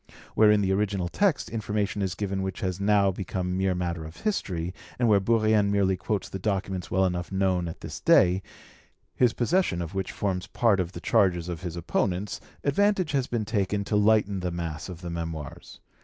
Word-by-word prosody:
Where 110 -1 +5
in 105 -1 +4
the 95 -1 +1
original 95 -2 0
text 195 - +1
information 105 -2 -2
is 95 -3 -1
given 95 0 -2
which 95 -1 -4
has 95 0 -2
now 100 -1 +3
become 90 -1 -3
mere 95 -1 +1
matter 85 -2 -2
of 80 +1 -10
history, 90 - -2 0.2
and 120 - +2
where 105 -2 +5
Bourrienne 110 0 +3
merely 100 -2 +2
quotes 100 +1 -2
the 95 - -6
documents 95 -2 -2
well 95 0 +2
enough 90 0 -2
known 95 -2 +1
at 80 - -8
this - - -7
day, 90 +2 +4 0.7
his 125 -2 +3
possession 125 - +1
of 85 +1 -5
which 95 -1 -2
forms 95 -2 -2
part 110 -5 +2
of 90 0 -2
the - - -7
charges 90 -3 +2
of 85 -2 -5
his 90 -3 -5
opponents, 90 +3 -1 0.2
advantage 190 +3 +2
has 135 -3 0
been 115 -3 -2
taken 100 -2 0
to 105 - -2
lighten 105 -1 +3
the 90 -1 -2
mass 85 -1 -5
of 90 -2 -8
the 85 -1 -5
Memoirs. 80 -3 -6
95 Hz, 195 wpm, -27 LUFS, 90-105 Hz, 0.7 s, Where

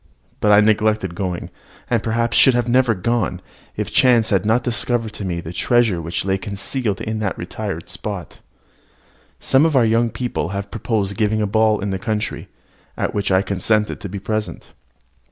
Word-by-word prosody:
But 105 - +3
I 105 0 +7
neglected 105 -3 +2
going, 90 -1 -4 0.4
and 120 -3 +1
perhaps 115 +1 0
should 125 -2 +5
never 125 -2 +3
have 90 - -13
gone, 115 -7 0 0.4
if - - -4
chance 120 -4 +4
had 100 0 +2
not 115 +2 +2
discovered 120 -1 -1
to 100 - -6
me 85 -2 -2
the 85 +1 -8
treasure 115 -5 +2
which 85 +3 -3
lay 95 0 0
concealed 105 +2 -3
in 110 0 -3
that 100 -3 -2
retired 95 -1 -5
spot. 95 0 -6 1.0
Some 135 +2 +3
of 160 -2 +2
our 125 -3 +5
young 115 +1 +2
people 120 -8 -3
had 100 +1 -5
proposed 105 -3 -2
giving 110 0 +1
a - - +2
ball 110 +1 +2
in 100 0 -2
the 95 - -2
country, 110 -1 -3 0.5
at - - -1
which 100 -1 -1
I 95 +1 +4
consented 105 +3 0
to 100 - -6
be 100 - -5
present. 110 +2 -4
105 Hz, 180 wpm, -20 LUFS, 95-115 Hz, 1.0 s, I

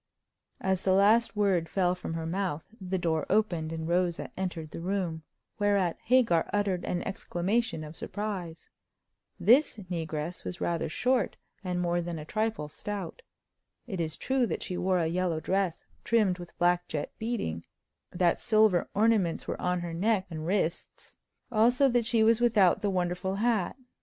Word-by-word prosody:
As 190 -1 0
the 190 - +2
last 215 +4 +4
word 190 -6 +1
fell 180 -2 +2
from 180 -2 -5
her 165 0 -3
mouth 175 -3 -2
the 190 0 -2
door 160 -3 0
opened, 175 -7 +1
and 160 0 -4
Rosa 175 0 0
entered 175 -5 -4
the - - -6
room, 175 -2 -2 0.4
whereat 200 -4 +1
Hagar 230 -9 +3
uttered 200 -3 0
an 175 - -2
exclamation 195 -1 -1
of 155 +1 -9
surprise. 190 -6 -5 0.7
This 250 0 +4
regress 160 0 -3
was 180 - -6
rather 165 -2 -1
short, 250 +5 0 0.3
and 180 -1 -2
more 175 0 +1
than 170 -1 -4
a 150 - -7
trifle 215 -4 -1
stout. 200 - -6 0.6
It 190 -7 -3
is 160 -2 -3
true 265 -2 +1
that - - -3
she 185 - -4
wore 185 +1 +1
a 170 - +1
yellow 170 0 0
dress 190 0 -1 0.2
trimmed 210 -6 +2
with 175 -1 -10
black 175 0 +2
jet 150 - -3
beading; 220 - -2 0.5
that 175 -1 +1
silver 215 -5 +3
ornaments 210 -5 +2
were - - -4
on 180 0 0
her 170 -1 -5
neck 195 +2 +1
and 155 0 -5
wrists; 180 -3 -2 0.4
also 245 +5 +4
that 240 -2 +2
she 225 -1 +3
was 225 +1 +4
without 205 -6 +4
the 205 - +1
wonderful 180 0 -1
hat. 220 -2 +1
185 Hz, 160 wpm, -29 LUFS, 170-210 Hz, 0.7 s, last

